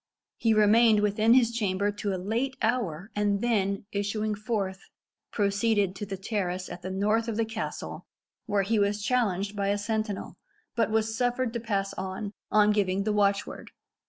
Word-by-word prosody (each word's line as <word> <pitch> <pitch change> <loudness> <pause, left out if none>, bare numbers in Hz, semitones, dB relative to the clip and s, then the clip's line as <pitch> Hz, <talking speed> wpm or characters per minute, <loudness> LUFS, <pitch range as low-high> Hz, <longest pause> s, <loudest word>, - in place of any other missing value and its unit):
He 225 -2 +3
remained 215 +1 +5
within 215 +3 +4
his 240 -3 +4
chamber 205 -3 0
to 205 0 -3
a 190 - -1
late 235 +8 -2
hour, 215 -5 -1
and 205 -1 +1
then 200 -4 0
issuing 210 +1 -1
forth, 205 -3 -3 0.4
proceeded 200 -1 +1
to 205 - -5
the 195 -1 -4
terrace 185 -2 -3
at 175 - -8
the 185 - -5
north 210 +4 +1
of 225 -2 -2
the 230 - +2
castle, 220 0 -5 0.4
where 205 -2 +2
he 215 +2 +1
was 205 0 +1
challenged 205 -5 0
by 200 -1 -1
a 200 +1 +1
sentinel, 215 -1 -3 0.4
but 230 -2 +2
was 220 0 0
suffered 245 0 0
to 235 - -2
pass 200 -4 -2
on, 190 +2 -4 0.2
on 210 0 +5
giving 200 -2 +1
the 215 +1 0
watch 200 -1 +2
word. - - -9
210 Hz, 175 wpm, -28 LUFS, 200-225 Hz, 0.4 s, remained